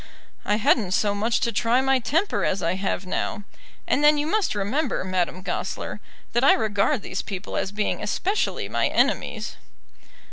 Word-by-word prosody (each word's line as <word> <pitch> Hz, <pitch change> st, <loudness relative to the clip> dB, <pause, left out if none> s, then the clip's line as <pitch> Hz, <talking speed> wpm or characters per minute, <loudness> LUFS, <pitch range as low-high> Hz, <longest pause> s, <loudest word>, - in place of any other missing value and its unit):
"I 205 Hz, -, +2 dB
hadn't 210 Hz, -3 st, +2 dB
so 210 Hz, -1 st, +2 dB
much 220 Hz, +4 st, +1 dB
to 235 Hz, -, +1 dB
try 235 Hz, +2 st, +2 dB
my 265 Hz, 0 st, +3 dB
temper 315 Hz, -, 0 dB
as 190 Hz, 0 st, 0 dB
I 165 Hz, +1 st, +1 dB
have 190 Hz, 0 st, -2 dB
now, 205 Hz, +3 st, -2 dB, 0.4 s
and 290 Hz, -, +1 dB
then 300 Hz, 0 st, +6 dB
you 295 Hz, -, 0 dB
must 390 Hz, -, 0 dB
remember, 225 Hz, +8 st, -1 dB
Madame 185 Hz, -1 st, -1 dB
Goesler, -, -, -4 dB, 0.3 s
that 240 Hz, -, +2 dB
I 275 Hz, -, +7 dB
regard 215 Hz, +3 st, +1 dB
these 185 Hz, -, -3 dB
people 195 Hz, 0 st, -6 dB
as 195 Hz, -, -1 dB
being 210 Hz, 0 st, -1 dB
especially 395 Hz, +3 st, -1 dB
my -, -, +1 dB
enemies." -, -, 0 dB
215 Hz, 170 wpm, -24 LUFS, 195-270 Hz, 0.4 s, I